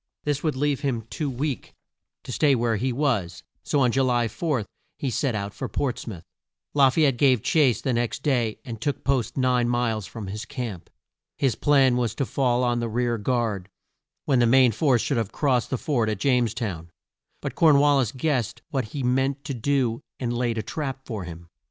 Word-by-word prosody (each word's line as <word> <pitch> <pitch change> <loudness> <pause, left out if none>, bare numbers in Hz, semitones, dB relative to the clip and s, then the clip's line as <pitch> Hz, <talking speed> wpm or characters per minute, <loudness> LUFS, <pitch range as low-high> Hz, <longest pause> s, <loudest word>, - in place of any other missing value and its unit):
This 145 -1 -1
would 155 -4 0
leave 145 0 0
him 130 -6 -1
too 150 -3 -2
weak 135 0 -4 0.5
to - - -7
stay 140 +2 +3
where 115 -2 +1
he 130 +5 -1
was, 120 - -1 0.2
so 145 - 0
on 125 -2 +4
Ju 135 - +2
ly 120 -2 +2
4 135 -4 -2 0.3
he 135 - -2
set 125 0 0
out 100 -1 -3
for - - -5
Ports 125 -4 -2
mouth. 95 -7 -7 0.5
La 140 -2 +6
fay 155 +4 +3
ette 135 -4 +2
gave 130 -5 +3
chase 135 -9 +3
the 130 - 0
next 120 0 -1
day 120 -7 0
and 115 -3 -7
took 145 +1 -2
post 135 -4 0
nine 125 -2 +2
miles 115 -4 0
from 110 -3 -7
his 105 +3 -5
camp. 120 -9 -6 0.5
His 135 -4 +2
plan 135 -1 +3
was 120 -4 -1
to 140 - -1
fall 125 -1 +1
on 120 -1 +1
the 120 -1 -2
rear 120 0 0
guard, 110 -5 -1 0.6
when 135 -3 +3
the 120 - +4
main 130 0 +6
force 125 +1 +2
should 140 - 0
have 110 -4 -1
crossed 130 -5 +1
the 130 - -1
ford 120 -5 0
at 105 - -1
James 120 0 +1
town. 90 -8 -4 0.5
But - - -4
Corn 155 -4 +5
wal 145 0 +5
lis 120 -5 0
guessed 130 -5 -1
what 130 -4 -1
he 130 +5 -5
meant 135 +3 +1
to 140 - -3
do 125 -1 0 0.2
and 120 -2 -2
laid 120 -1 0
a 110 - -1
trap 135 -3 -5
for 105 -6 -5
him. 85 0 -9
125 Hz, 205 wpm, -25 LUFS, 115-140 Hz, 0.6 s, La